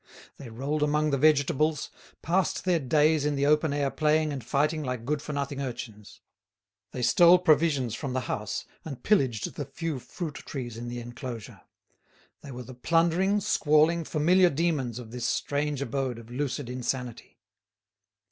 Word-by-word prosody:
They 135 - -9
rolled 140 +7 -3
among 150 +1 +2
the 140 - +2
vegetables, 155 +1 +2 0.3
passed 185 +4 0
their 180 -2 +3
days 150 +2 +3
in 150 0 0
the 140 0 +1
open 150 +1 +3
air 140 -1 0
playing 155 0 +1
and 135 -4 -5
fighting 150 +6 0
like 125 -4 -4
good 145 +2 -1
for 150 - -6
nothing 140 -1 -3
urchins. 115 -5 -7 0.7
They 125 - -4
stole 175 +8 +7
provisions 150 -8 +2
from 130 +2 -4
the 130 - 0
house 105 -3 -4 0.2
and 140 -6 -8
pillaged 130 - +1
the 145 - -5
few 160 -1 -4
fruit 160 +4 -6
trees 120 -5 -6
in 120 +1 -6
the 120 0 -5
enclosure; 120 -1 -8 0.8
they - - -11
were 125 -1 -7
the 130 +2 -10
plundering, 170 +9 +2
squalling, 165 -3 +3
familiar 175 +4 +3
demons 145 -7 -1
of 120 -3 -9
this 120 -1 -3
strange 145 -1 -1
abode 130 -1 -2
of 115 0 -12
lucid 135 0 -3
insanity. 125 -1 -4
145 Hz, 160 wpm, -27 LUFS, 125-155 Hz, 0.8 s, stole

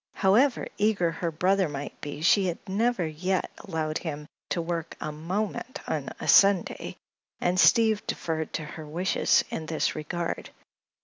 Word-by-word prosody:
However 235 +8 +3
eager 200 -5 +2
her 170 +1 -2
brother 185 +2 +2
might 145 0 -6
be 145 0 -6
she 190 +3 +4
had 170 - -2
never 210 0 +1
yet 180 +4 -1
allowed 160 -5 -3
him 150 -3 -5 0.2
to - - -1
work 170 -1 -3
a 155 - -4
moment 190 +10 -3
on - - -2
a - - -5
Sunday, 195 -3 +4 0.4
and 180 +1 +1
Steve 215 +6 +5
deferred 160 -2 -2
to 155 - -2
her 155 +1 -8
wishes 175 +5 +2
in 160 - -4
this 160 -1 0
regard. 170 +3 -4
175 Hz, 150 wpm, -27 LUFS, 155-195 Hz, 0.4 s, Steve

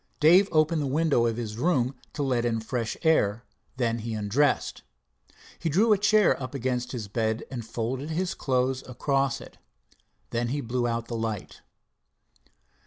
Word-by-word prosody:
Dave 180 +6 +6
opened 155 0 +3
the 140 - -1
window 140 -4 +2
of 115 - -1
the 110 -2 -4
room 135 -7 +2 0.2
to 145 - -2
let 125 -3 +1
in 115 -2 0
fresh 115 0 -3
air, 115 -9 +2 0.3
then 115 -2 0
he 115 0 -4
undressed. 110 +8 +1 0.8
He 165 - -1
drew 210 +8 +4
a - - +3
chair 205 -5 +4
up 130 +2 -5
against 125 -1 -2
his 115 -5 -5
bed 110 +2 -1
and 120 -3 -4
folded 120 +6 -3
his 175 +3 -1
clothes 130 0 0
across 135 +2 0
it. - - -13 0.7
Then 120 0 0
he 140 +5 -1
blew 120 -1 -1
out 115 0 -2
the 120 - -4
light. 110 -3 -4
125 Hz, 165 wpm, -27 LUFS, 115-150 Hz, 0.8 s, Dave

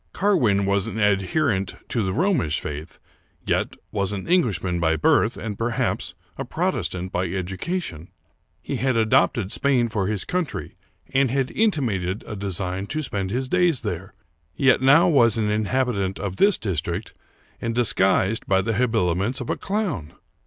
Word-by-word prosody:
Carwin 125 - +2
was 100 -1 +1
an 110 - -4
adherent 105 +2 +1
to 120 - 0
the 95 -2 -1
Romish 145 - +1
faith, 75 +3 -6 0.5
yet - - 0 0.2
was 100 -2 -1
an 100 -2 -5
Englishman 100 - +1
by 80 -1 +2
birth, 80 - +2
and, 105 -3 -5
perhaps, 115 0 -1 0.2
a - - -1
Protestant 90 0 -2
by 90 +1 -1
educa 95 - -3
tion. 80 - -8 0.6
He - - -3
had 130 -2 +1
adopted 110 -2 +2
Spain 130 -4 +2
for 100 -3 -1
his 105 -2 -2
country, 180 -5 -3 0.4
and 135 -1 +3
had 135 +1 0
inti 210 -10 +1
mated 95 -4 -2
a 105 - -6
design 95 -1 -3
to 155 +5 -3
spend 100 -7 -2
his 130 +5 -2
days 175 -3 +2
there, 95 -2 -5 0.4
yet 130 -2 +3
now 140 +5 +6
was 120 - +4
an 105 -2 0
inhabitant 105 -3 0
of 95 -1 -4
this 205 0 +4
district, 85 0 -3 0.5
and 115 0 -2
disguised 100 -2 +2
by 95 -1 +3
the 115 - -1
habiliments 110 -1 0
of 125 - -3
a - - 0
clown 185 - -3
105 Hz, 160 wpm, -23 LUFS, 95-130 Hz, 0.6 s, now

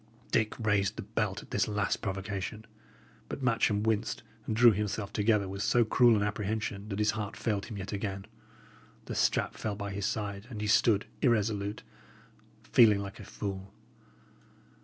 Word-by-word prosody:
Dick 110 -2 +1
raised 105 -4 +1
the - - -5
belt - - -2
at - - -18
this - - +1
last 105 -1 -1
provocation, 95 +2 -4 0.6
but 140 - -5
Matcham 110 -4 +2
winced 110 0 0 0.2
and 110 - -1
drew 120 +1 +8
himself 105 0 -2
together 105 -1 +2
with 100 +1 -5
so 120 +2 +3
cruel 120 +1 +5
an 105 - +1
apprehension, 105 0 -2
that 100 - -3
his 105 0 +2
heart 110 0 -5
failed 105 -4 -1
him 110 - -7
yet 95 +1 -5
again. 100 -1 -3 0.8
The - - -5
strap - - +1
fell 105 -2 -3
by 100 0 -5
his 100 0 -2
side, 100 -1 -3
and 110 -5 -6
he 105 - -2
stood 105 0 +4 0.2
irresolute, 105 -5 +1 0.8
feeling 110 -4 +6
like 100 -1 -7
a - - -8
fool. 95 -1 -6
105 Hz, 165 wpm, -30 LUFS, 100-110 Hz, 0.8 s, drew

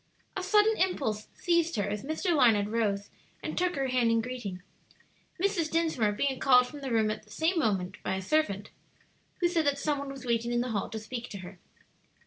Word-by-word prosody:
A 380 - -2
sudden 420 +3 +4
impulse 230 - 0
seized 340 -3 +1
her 205 -2 0
as 205 0 -3
Mr. 315 +5 0
Larned 220 -7 +4
rose 205 -3 0 0.3
and - - -3
took 360 0 +1
her 270 -2 -1
hand 250 -2 +2
in 230 0 +3
greeting, 225 -7 -5 0.8
Mrs. 370 -4 +1
Dinsmore 315 -11 +1
being 265 +5 -1
called 250 -2 +6
from 290 +3 -9
the 270 - -4
room 220 -2 +2
at - - -5
the 215 - -23
same 325 - +1
moment 195 - -1
by 190 - -1
a 190 - -3
servant, 205 -5 0 0.7
who 350 - +5
said 335 -4 +1
that 280 -1 +2
some 290 0 0
one 280 0 -5
was 270 -2 -8
waiting 235 0 0
in 240 0 +1
the 250 0 -2
hall 205 -2 -1
to 225 - -5
speak 235 +2 -6
to 200 - -7
her. 180 0 -11
250 Hz, 210 wpm, -29 LUFS, 215-315 Hz, 0.8 s, called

